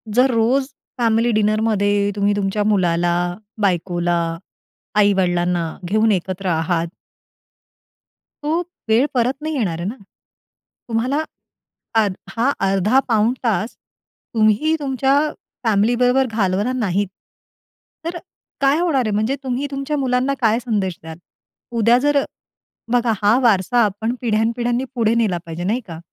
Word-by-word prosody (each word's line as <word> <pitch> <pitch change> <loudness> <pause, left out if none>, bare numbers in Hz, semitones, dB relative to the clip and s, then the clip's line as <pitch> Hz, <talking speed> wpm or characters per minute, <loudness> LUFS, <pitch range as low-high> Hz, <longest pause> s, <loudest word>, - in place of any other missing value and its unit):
जर 255 +1 +4
रोज 245 +4 +2 0.3
फॅमिली 230 0 +2
डिनरमध्ये 210 -1 +1
तुम्ही 205 0 +2
तुमच्या 205 +1 0
मुलाला, 175 -4 +2 0.5
बायकोला, 175 -2 +1 0.8
आई-वडिलांना 180 -4 +2 0.2
घेऊन 215 +2 +3
एकत्र 185 +1 -3
आहात. 165 +1 0 1.6
तो 320 +4 +1 0.3
वेळ 230 +5 +4
परत 245 +1 +2
नाही 310 0 -3
येणार 180 -10 -1
आहे 175 - -3
ना? 230 - -4 0.9
तुम्हाला 255 +7 0 0.8
अध 200 - -1 0.2
हा 240 +4 +2 0.2
अर्धा-पाऊण 220 +3 +2
तास 220 0 0 0.6
तुम्ही 220 +9 +3
तुमच्या 270 -1 +1 0.5
फॅमिलीबरोबर 245 +5 +3
घालवणार 205 +2 0
नाहीत, 205 -4 0 1.0
तर 340 +1 -3 0.4
काय 275 +2 +3
होणार 290 -8 +1
आहे? 215 - -1
म्हणजे 220 +7 0
तुम्ही 260 +2 -2
तुमच्या 275 +2 -3
मुलांना 260 +1 +1
काय 225 -1 +3
संदेश 200 -7 -1
द्याल? 160 0 -9 0.6
उद्या 230 +2 +5
जर 285 +1 +2 0.7
बघा 240 -2 +2
हा 210 +4 +4
वारसा 230 +2 +3
आपण 215 +4 -2
पिढ्यान-पिढ्यांनी 235 +2 0
पुढे 230 -2 +2
नेला 215 -7 +1
पाहिजे 165 +1 -5
नाही 225 +7 0
का? 165 -2 -8
220 Hz, 120 wpm, -20 LUFS, 195-250 Hz, 1.6 s, उद्या